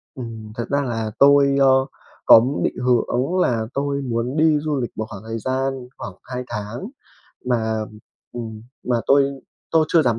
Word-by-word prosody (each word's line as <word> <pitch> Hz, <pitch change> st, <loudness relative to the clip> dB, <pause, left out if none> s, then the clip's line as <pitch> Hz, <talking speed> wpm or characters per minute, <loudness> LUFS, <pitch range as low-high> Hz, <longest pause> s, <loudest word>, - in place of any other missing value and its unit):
Ừm, 115 Hz, -4 st, -8 dB
thật 115 Hz, -, -3 dB
ra 140 Hz, 0 st, +1 dB
là 115 Hz, -5 st, -3 dB
tôi, 140 Hz, 0 st, +6 dB
ờ, 130 Hz, -1 st, +5 dB, 0.4 s
có 115 Hz, -, +9 dB, 0.2 s
định -, -, -1 dB
hướng 125 Hz, -1 st, +2 dB
đúng 135 Hz, +9 st, 0 dB
là 120 Hz, -11 st, +1 dB
tôi 140 Hz, 0 st, -1 dB
muốn 125 Hz, +1 st, -2 dB
đi 155 Hz, -1 st, +4 dB
du 150 Hz, -2 st, -2 dB
lịch 120 Hz, -, -3 dB
một 110 Hz, -, -2 dB
khoảng 100 Hz, -1 st, -9 dB
thời 115 Hz, +1 st, -5 dB
gian 130 Hz, +1 st, -2 dB
khoảng 100 Hz, -, -7 dB
2 125 Hz, -1 st, -5 dB
tháng 105 Hz, -, -5 dB, 0.6 s
mà 110 Hz, -3 st, 0 dB, 0.5 s
ừm, 110 Hz, -3 st, -7 dB, 0.2 s
mà 125 Hz, -1 st, +1 dB
tôi 140 Hz, 0 st, +3 dB, 0.3 s
tôi 160 Hz, -1 st, +4 dB
chưa 165 Hz, -1 st, +4 dB
dám 120 Hz, -5 st, +1 dB
125 Hz, 175 wpm, -21 LUFS, 115-140 Hz, 0.6 s, có